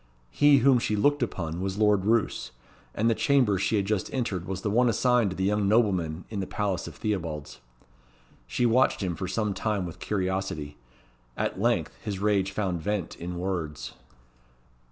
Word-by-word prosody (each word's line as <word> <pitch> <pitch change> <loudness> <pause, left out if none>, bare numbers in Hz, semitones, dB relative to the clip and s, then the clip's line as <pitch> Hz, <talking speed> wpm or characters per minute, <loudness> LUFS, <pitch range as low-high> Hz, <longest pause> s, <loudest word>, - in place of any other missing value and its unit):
He 145 - +5
whom 135 -3 +6
she 105 - -1
looked 145 +7 +2
upon 85 -7 -3
was 95 0 -3
Lord 105 -2 +3
Roos, 110 - +1 0.4
and 110 - +1
the 115 - +4
chamber 125 -6 +2
she 110 - +1
had 100 -2 +1
just 105 -2 -1
entered 105 -9 -2
was 95 0 -4
the 105 - 0
one 120 +3 +4
assigned 120 -1 +3
to 95 - -5
the 95 - -2
young 105 +1 +1
nobleman 95 -7 +1
in 105 - -3
the 95 - -3
Palace 100 -3 -2
of - - -9
Theobalds. 80 -10 -4 0.9
She 120 - 0
watched 120 -2 +3
him 90 -3 -2
for 95 - -4
some 105 +2 -1
time 105 -2 -1
with 85 - -8
curiosity. 95 -7 -2 0.6
At - - -2
length - - +1
his 100 -2 -3
rage 100 -1 +1
found 95 -4 -2
vent 100 -1 -2
in 90 +1 -5
words. 85 -5 -4
100 Hz, 175 wpm, -27 LUFS, 90-110 Hz, 0.9 s, whom